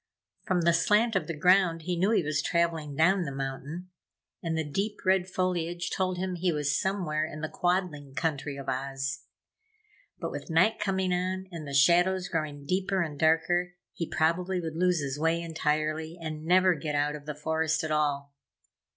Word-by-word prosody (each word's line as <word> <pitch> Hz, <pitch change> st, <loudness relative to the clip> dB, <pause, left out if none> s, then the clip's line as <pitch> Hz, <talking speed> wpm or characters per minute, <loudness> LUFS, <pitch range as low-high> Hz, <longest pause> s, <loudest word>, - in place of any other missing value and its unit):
From 180 Hz, -2 st, +2 dB
the 170 Hz, 0 st, +4 dB
slant 210 Hz, +6 st, +3 dB
of 170 Hz, -5 st, 0 dB
the 165 Hz, -, -4 dB
ground 180 Hz, -1 st, +4 dB
he 180 Hz, +2 st, -1 dB
knew 185 Hz, +4 st, +2 dB
he 220 Hz, -5 st, +3 dB
was 150 Hz, 0 st, 0 dB
travelling 165 Hz, -4 st, 0 dB
down 185 Hz, +6 st, +4 dB
the 155 Hz, -5 st, -3 dB
mountain, 140 Hz, +6 st, -5 dB, 0.5 s
and 165 Hz, -1 st, -2 dB
the 160 Hz, -2 st, -1 dB
deep, 200 Hz, +8 st, -2 dB
red 185 Hz, -1 st, +3 dB
foliage 175 Hz, -2 st, -1 dB
told 185 Hz, -1 st, -1 dB
him 185 Hz, 0 st, -2 dB
he 180 Hz, 0 st, 0 dB
was 145 Hz, -2 st, 0 dB
somewhere 175 Hz, -6 st, 0 dB
in 155 Hz, -1 st, -5 dB
the 155 Hz, -, -2 dB
Quadling 175 Hz, -7 st, -1 dB
country 145 Hz, 0 st, -2 dB
of 140 Hz, -, -8 dB
Oz. 135 Hz, +1 st, -3 dB, 0.9 s
But -, -, -4 dB
with -, -, -7 dB
night 180 Hz, +7 st, +3 dB
coming 190 Hz, -3 st, 0 dB
on 185 Hz, +1 st, -1 dB
and 165 Hz, -4 st, -7 dB
the 140 Hz, -, -6 dB
shadows 180 Hz, +5 st, +4 dB
growing 155 Hz, -4 st, -3 dB
deeper 190 Hz, +2 st, 0 dB
and 150 Hz, -3 st, -6 dB
darker, 175 Hz, +3 st, +2 dB, 0.2 s
he 165 Hz, -, -3 dB
probably 175 Hz, +4 st, +1 dB
would 160 Hz, -2 st, -5 dB
lose 180 Hz, -1 st, +2 dB
his 140 Hz, 0 st, -3 dB
way 165 Hz, +2 st, +2 dB
entirely 155 Hz, 0 st, -1 dB
and 155 Hz, -1 st, -6 dB
never 185 Hz, +2 st, +5 dB
get 150 Hz, -2 st, -4 dB
out 145 Hz, +1 st, +1 dB
of 150 Hz, 0 st, -11 dB
the 150 Hz, -, -4 dB
forest 160 Hz, +1 st, 0 dB
at 160 Hz, -, -3 dB
all. 145 Hz, -2 st, 0 dB
165 Hz, 185 wpm, -28 LUFS, 150-180 Hz, 0.9 s, never